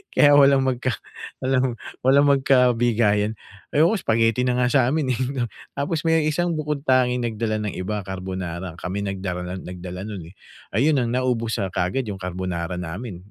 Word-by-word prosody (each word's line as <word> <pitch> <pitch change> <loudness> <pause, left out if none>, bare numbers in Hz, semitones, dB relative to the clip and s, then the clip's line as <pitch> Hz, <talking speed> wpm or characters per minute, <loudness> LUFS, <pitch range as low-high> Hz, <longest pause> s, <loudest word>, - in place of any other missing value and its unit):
Kaya 145 -1 +6
walang 140 -1 +6
mag 130 -2 +1
ka 130 0 0 0.5
walang 130 -1 +1 0.3
walang 140 +2 +5
magkabigayan. 120 -6 +3 0.4
Ayoko, 165 +9 +4
spaghetti 115 +2 +2
na 125 - +2
nga 125 - +3
sa 135 -4 +4
'min, 155 -4 0
eh. 120 - -4 0.5
Tapos 155 +3 -2
may 160 -1 +3
isang 175 +3 0
bukod-tanging 130 -5 +1
nagdala 110 -1 -1
ng 105 - -3
iba, 105 +3 -3
carbonara, 95 -2 -5
kami 95 +4 -4
nagdara 90 -2 -4
nagdala 90 +1 -7
no'n, 95 -6 -7
eh. - - -43 0.4
Ayun 145 +5 +3
ang 120 - -1
naubos, 125 -3 0
ah, 95 - -1
kaagad 105 +9 -1
'yong 100 -2 -6
carbonara 90 -1 -3
namin. 90 +2 -6
115 Hz, 160 wpm, -23 LUFS, 95-135 Hz, 0.5 s, Kaya